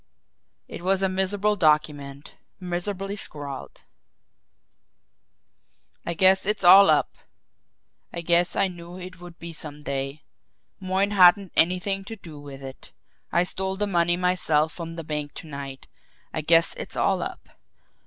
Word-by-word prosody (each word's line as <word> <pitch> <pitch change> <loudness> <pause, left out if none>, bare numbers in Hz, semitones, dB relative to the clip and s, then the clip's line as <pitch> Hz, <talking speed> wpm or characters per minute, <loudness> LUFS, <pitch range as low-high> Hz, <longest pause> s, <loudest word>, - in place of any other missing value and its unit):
It - - -9
was 190 +2 +1
a 190 - +2
miserable 195 +3 0
document, 150 -4 0 0.3
miserably 190 +2 -4
scrawled: 145 -8 -5 2.2
"I 170 - -4
guess 190 +2 +4
it's 210 -1 0
all 195 +3 +9
up. - - +1 0.9
I 170 - -5
guess 170 +1 +2
I - - +2
knew 175 0 -10
it 185 0 -10
would 175 -1 -11
be 170 0 -8
some 150 -2 -5
day. 140 +1 -4 0.6
Moyne 190 +1 0
hadn't 190 -1 +5
anything 185 +3 +2
to 225 - -7
do 165 -8 -12
with 140 -1 -10
it. 135 0 -10 0.4
I 175 - +3
stole 190 +1 -3
the 210 - 0
money 175 -3 +1
myself 170 -4 +1
from 165 -1 -7
the 165 - -6
bank 150 -1 -5
to - - -9
night. 140 -2 -8 0.5
I 155 - -2
guess 165 +2 +4
it's - - -6
all - - +1
up. - - -6
175 Hz, 145 wpm, -25 LUFS, 155-190 Hz, 2.2 s, all